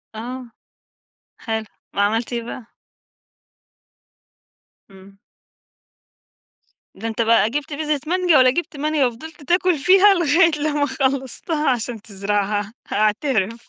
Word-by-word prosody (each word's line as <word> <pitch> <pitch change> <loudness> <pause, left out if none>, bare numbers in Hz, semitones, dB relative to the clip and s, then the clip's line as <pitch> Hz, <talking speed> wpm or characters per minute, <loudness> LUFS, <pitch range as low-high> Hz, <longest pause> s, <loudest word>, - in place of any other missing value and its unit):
آه، 245 +2 -7 0.9
حلو 220 -1 -3 0.3
وعملت 220 +4 0
إيه 235 -1 -2
بقى؟ 235 0 -8 2.2
إمم. 195 +1 -17 1.8
ده 220 +4 -5
أنت 225 0 -2
بقى 230 -1 +3
جبت 290 +4 -4
بذرة 300 0 -1
مانجا 355 -2 +3
والّا 255 -1 +6
جيبت 335 0 -4
مانجا 300 -1 +1
وفضلت 295 +6 -10
تأكل 355 +2 +2
فيها 380 +7 +5
لغاية 335 -1 +3
لما 295 -1 0
خلصتها 275 +3 -1
عشان 240 -3 -2
تزرعها 205 +1 -2 0.2
أعترف. 215 +1 0
255 Hz, 105 wpm, -21 LUFS, 220-305 Hz, 2.2 s, والّا